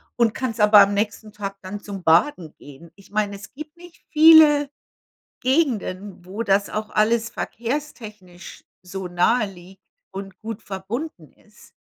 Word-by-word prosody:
und 235 -2 +2
kannst 235 -4 -3
aber 210 0 +7
am 200 0 +5
nächsten 210 +1 -3
Tag 195 -1 -6
dann 200 +2 -7
zum 200 -2 -8
Baden 165 - +2
gehen. 145 +4 -15
Ich 200 0 -20
meine, 210 -1 -1
es 200 +1 -12
gibt 300 +3 -10
nicht 350 -1 -16
viele 305 -2 +7 0.7
Gegenden, 210 - -1
wo 205 +5 -5
das 200 -1 +1
auch 215 0 -4
alles 225 +2 +1
verkehrstechnisch 215 -8 -7 0.2
so 185 0 -7
naheliegt 190 0 -1 0.3
und 195 -1 -9
gut 225 0 -7
verbunden 195 - -7
ist. 210 +1 -22
210 Hz, 140 wpm, -22 LUFS, 190-235 Hz, 0.7 s, aber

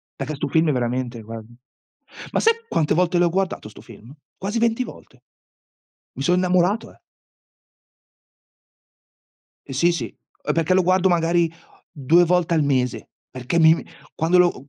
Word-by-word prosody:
perché 140 +2 -5
'sto 145 +1 -4
film, 160 +2 +2
è - - +3
veramente 125 -1 -2
guardi 115 +1 -10 0.8
ma - - 0
sai, 455 +1 +4
quante 155 -2 0
volte 180 +1 +1
l'ho 175 0 +3
guardato 185 - -2
'sto 105 - -14
film? 115 +3 -14 0.2
Quasi 205 +4 -3
20 230 +2 +1
volte. 130 - -14 0.9
Mi 135 - -5
son 180 +5 +2
innamorato, 185 +3 +1
eh. - - -25 2.7
E 135 - -7
sì, 170 +6 +3
sì. 160 -9 -3 0.4
Eh, - - 0
perché 165 +2 +1
lo 185 - +4
guardo 185 +1 +3
magari, 170 -1 +2 0.4
2 160 +5 +3
volte 175 -1 +1
al 160 -2 +2
mese, 130 -3 -1 0.2
perché 130 +6 -2
mi, 160 -1 +7
mhmm - - -6 0.3
quando 165 +3 +2
lo 175 -7 +2
165 Hz, 155 wpm, -22 LUFS, 130-180 Hz, 2.7 s, mi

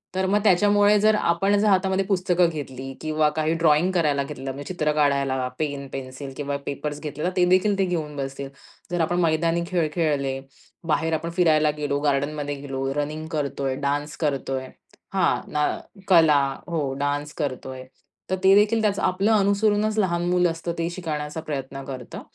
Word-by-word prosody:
तर 190 - +1
मग 205 +2 +3
त्याच्यामुळे 205 +2 +4
जर 215 +1 +4
आपण 195 +2 +2
जर 215 - +2
हातामध्ये 190 -1 +2
पुस्तकं 180 -3 +2
घेतली 135 -4 -6
किंवा 155 -1 +1
काही 155 +1 +1
ड्रॉइंग 165 +2 +3
करायला 150 -5 +2
घेतलं. 135 -2 -6
म्हणजे 140 +6 -7
चित्र 155 -4 0
काढायला, 140 -3 +1
पेन, 140 -2 -3
पेन्सिल 135 +1 -7
किंवा 145 -1 -2
पेपर्स 145 +1 -4
घेतले. 150 0 -5
तर 180 - +2
ते 180 - +5
देखील 195 +2 +3
ते 195 - +3
घेऊन 160 -5 -3
बसतील. 135 0 -5 0.4
जर 175 -1 0
आपण 175 +2 +1
मैदानी 165 0 +1
खेळ 175 -4 +1
खेळले. 140 -5 0 0.5
बाहेर 160 +1 +1
आपण 165 +1 -2
फिरायला 155 -3 +4
गेलो. 145 -1 -1
गार्डनमध्ये 145 0 -1
गेलो. 135 -1 -5
रनिंग 155 +2 -3
करतोय. 140 -3 -2
डान्स 145 +2 -2
करतोय. 135 -3 -2 0.5
हां. - - +2
ना 150 0 +1 0.4
कला. 160 -5 +6 0.3
हो, 150 -6 -2
डान्स 145 +1 -2
करतोय. 130 -3 -4 0.5
तर 190 - +1
ते 190 - +7
देखील 215 +2 +4
त्याचं 205 -2 +1
आपलं 195 +4 +1
अनुसरूनच 210 +2 +2
लहान 175 -3 +1
मुलं 180 -1 +3
असतं 165 +1 -4
ते 165 0 -1
शिकण्याचा 155 -3 -4
प्रयत्न 135 -2 -4
करतं. 130 -3 -7
155 Hz, 165 wpm, -24 LUFS, 140-180 Hz, 0.5 s, ते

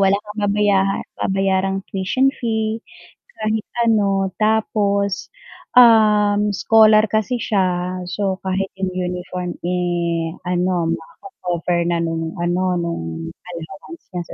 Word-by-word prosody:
wala 195 0 +4
kang 210 +1 -7
babaya 200 -1 +2 0.2
babayarang 195 0 0
tuition 255 +8 +1
fee, 220 -1 -1 0.6
kahit 215 0 -1 0.2
ano. 195 -3 +2
Tapos, 210 - 0 0.4
um, 210 -3 +5
scholar 215 +1 +5
kasi 220 +3 0
siya 185 -2 0
so 190 +1 -2
kahit 190 +1 -1
yung 190 -1 -2
uniform, 180 0 -4
eh, 175 -2 -1
ano, 180 -2 0
mako-cover 175 -2 -3
na 170 - +1
nung 165 +1 -3
ano, 180 +1 0
nung 170 - -3 0.3
allowance 195 - -10
niya 175 -1 -3
sa - - -8
195 Hz, 115 wpm, -20 LUFS, 180-210 Hz, 0.6 s, um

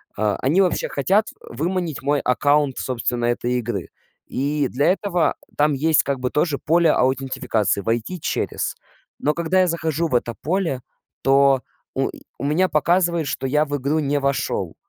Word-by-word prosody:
а, 105 -1 +1
они 155 +9 +4
вообще 180 - +1
хотят 195 +10 +2 0.2
выманить 170 -2 -3
мой 145 +1 +2
аккаунт, 145 +1 +2
собственно, 120 -1 -2
этой 120 +1 0
игры. 120 -7 -2 0.4
И 145 +1 -1
для 145 +7 +2
этого 180 -5 0 0.2
там 150 0 +3
есть 155 +3 +3
как 140 -2 -2
бы 125 - 0
тоже 150 0 0
поле 165 0 +3
аутентификации- 130 -6 0
"войти 115 - -2
через". - - -2 0.4
Но, 150 - +1
когда 170 +3 +1
я 185 - +3
захожу 165 -1 -1
в 155 - -6
это 120 -1 0
поле, 165 -5 -1 0.4
то 135 -1 +4 0.3
у - - 0 0.3
у - - -7
меня 170 +6 +2
показывает, 170 +2 +2
что 135 - -2
я 150 +3 +2
в 145 -1 -3
игру 140 +3 0
не 145 0 0
вошел, 140 0 -1
145 Hz, 160 wpm, -22 LUFS, 130-165 Hz, 0.4 s, они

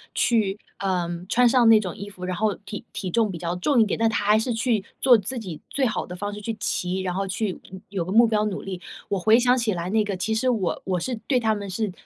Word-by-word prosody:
去， 215 -4 +2 0.2
呃， 185 -3 0 0.2
穿 245 +2 +4
上 240 -1 +4
那 220 -1 +8
种 185 -5 -5
衣 200 +1 -7
服， 185 -2 -8
然 180 0 -2
后 210 +2 0
体 205 +2 -8
体 185 - -4
重 225 +2 +2
比 175 - -6
较 170 +1 -3
重 245 +8 +2
一 - - +5
点， 205 - -2
但 225 0 +3
她 215 -2 -1
还 210 +1 +5
是 240 +2 -1
去 225 -2 0 0.2
做 250 -3 +7
自 220 +5 -4
己 185 -9 -6
最 275 - 0
好 220 - -1
的 180 - -7
方 205 +3 -4
式 210 - -7
去 225 +2 -3
骑， 185 -2 -1
然 185 -1 -2
后 195 +2 -2
去， 190 0 -2
嗯， 190 0 -9
有 195 -3 -2
个 180 - -6
目 230 +4 +6
标 215 -1 +1
努 200 -2 -3
力。 185 -2 -6 0.3
我 200 - 0
回 220 +5 +5
想 250 +1 +3
起 230 -4 0
来 175 0 -3
那 215 +2 +2
个， 205 -2 -3
其 220 +4 -1
实 230 +4 +1
我 215 -8 -1
我 185 -2 0
是 250 +8 -2
对 260 -3 +3
她 220 -2 +1
们 200 -2 -5
是 205 +2 -2
210 Hz, 295 characters per minute, -24 LUFS, 185-225 Hz, 0.3 s, 那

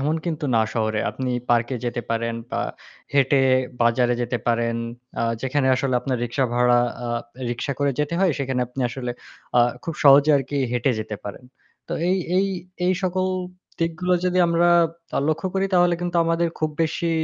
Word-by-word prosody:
এমন 150 +4 +1
কিন্তু 160 -3 -3
না 110 - +4
শহরে। 110 -2 0
আপনি 130 -1 -3 0.2
পার্কে 120 +2 +2
যেতে 120 0 -2
পারেন 115 0 -1 0.2
বা - - -1 0.5
হেঁটে 140 -1 +3 0.4
বাজারে 120 +1 +3
যেতে 120 0 -2
পারেন। 115 0 +1 0.4
আ - - +1 0.2
যেখানে 135 +1 0
আসলে 130 0 0
আপনার 130 -1 -2
রিক্সা 120 +3 0
ভাড়া 120 0 +4 0.3
আ - - -3 0.4
রিক্সা 120 +4 -2
করে 145 0 +2
যেতে 150 +3 -1
হয়, 190 -4 +3
সেখানে 130 -2 -1
আপনি 125 +2 -7
আসলে 125 +1 -5 0.5
আ - - +7 0.2
খুব 165 - -3
সহজে 140 +2 +7
আরকি 140 +1 -3 0.2
হেঁটে 125 +2 +1
যেতে 105 -1 -5
পারেন। 105 +5 -8 0.4
তো - - -4 0.2
এই 185 - +3 0.2
এই 195 - +2 0.4
এই 185 - +4
সকল 185 0 0 0.5
দিকগুলো 170 +2 0
যদি 180 0 +1
আমরা 170 +1 +3 0.5
আ - - +2
লক্ষ্য 155 +4 0
করি 195 0 +1
তাহলে 175 -1 +4
কিন্তু 175 0 -2
আমাদের 165 +1 +1
খুব 155 -1 0
বেশি 165 +2 -1
135 Hz, 175 wpm, -23 LUFS, 120-165 Hz, 0.5 s, আ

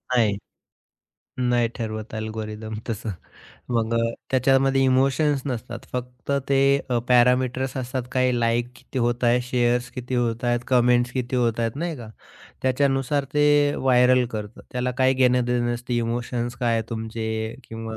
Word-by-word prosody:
नाही. 105 -5 +3 1.0
नाही 120 -2 +2
ठरवत 110 -2 -5
अल्गोरिदम 110 0 -5
तसं. 110 -1 -3 0.6
मग 115 -1 0
अ, - - +2 0.3
त्याच्यामध्ये 135 +1 +3
इमोशन्स 135 +2 +2
नसतात, 125 -3 -4
फक्त 125 +1 -6 0.2
ते 135 -1 +3 0.3
अ, 120 - +2
पॅरामीटर्स 125 +1 +3
असतात 130 0 -3
काही 130 -1 +2
लाइक 120 +1 +1
किती 130 +1 -7
होत 120 0 0
आहे, 120 +1 +4
शेअर्स 125 0 0
किती 125 0 -4
होत 120 -1 0
आहेत, 120 0 +1
कमेंट्स 125 -1 +3
किती 125 -1 -2
होत 120 -2 +1
आहेत 115 +2 -1
नाही 165 +1 -3
का. 120 -4 -9 0.5
त्याच्यानुसार 135 +1 +1
ते 145 -1 +4
व्हायरल 125 -1 +4
करतं, 105 -1 -6
त्याला 125 0 -1
काही 130 0 +4
घेणं-देणं 125 -2 +2
नसतं 120 +1 -5
इमोशन्स 120 +1 -2
काय 120 -2 +2
आहे 115 - +1
तुमचे, 110 0 -3
किंवा 115 0 -6
125 Hz, 145 wpm, -24 LUFS, 115-130 Hz, 1.0 s, आहे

